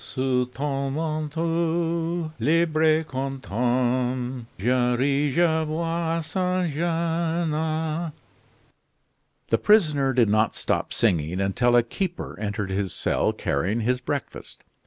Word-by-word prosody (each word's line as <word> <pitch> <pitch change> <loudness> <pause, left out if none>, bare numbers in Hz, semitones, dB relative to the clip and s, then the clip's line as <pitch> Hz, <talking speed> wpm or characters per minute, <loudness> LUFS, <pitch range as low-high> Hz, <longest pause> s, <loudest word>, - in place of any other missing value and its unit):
Sous 130 -1 0
ton 135 +1 -3
manteau, 165 +2 -1
libre 155 +5 +2
et 160 0 +3
content, 125 - -1
Je 125 +4 +2
ris, 140 +2 +1
je 160 -2 +3
bois, 165 +1 -1
sans 180 +1 0
gene 165 +1 0 1.5
" - - -42
The - - +5
prisoner 155 -11 +4
did 120 -3 +4
not 110 +1 +2
stop - - -1
singing 90 -5 +1
until 120 +6 +2
a 120 - +5
keeper 180 +9 -4
entered 105 -2 -3
his 95 -1 -1
cell - - +1
carrying 95 +12 -1
his 125 +3 0
breakfast. 140 +2 -5
140 Hz, 115 wpm, -25 LUFS, 120-165 Hz, 1.5 s, The